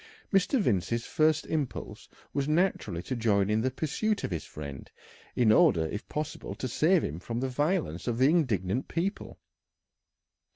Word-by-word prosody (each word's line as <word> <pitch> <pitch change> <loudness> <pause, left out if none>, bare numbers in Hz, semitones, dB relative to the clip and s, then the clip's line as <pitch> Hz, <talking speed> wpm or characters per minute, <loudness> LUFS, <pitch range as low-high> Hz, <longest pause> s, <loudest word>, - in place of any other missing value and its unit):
Mr. 195 +7 +3
Vincey's 115 - 0
first 155 -2 +2
impulse 150 -6 -4 0.2
was 140 0 0
naturally 150 - 0
to 130 - -3
join 105 -3 +2
in 110 +1 +2
the 130 - +1
pursuit 160 - -1
of - - -3
his 85 -3 -3
friend, 70 -3 -8 0.5
in 115 -3 +4
order 85 -6 +5
if 105 +8 -6
possible 150 0 -4
to 130 - -4
save 165 +7 +3
him 75 +4 -3
from 115 +5 -4
the 130 - -1
violence 145 - -1
of 120 -1 0
the 130 +2 +5
indignant 125 - +1
people. 190 +5 -3
125 Hz, 160 wpm, -29 LUFS, 100-155 Hz, 0.5 s, order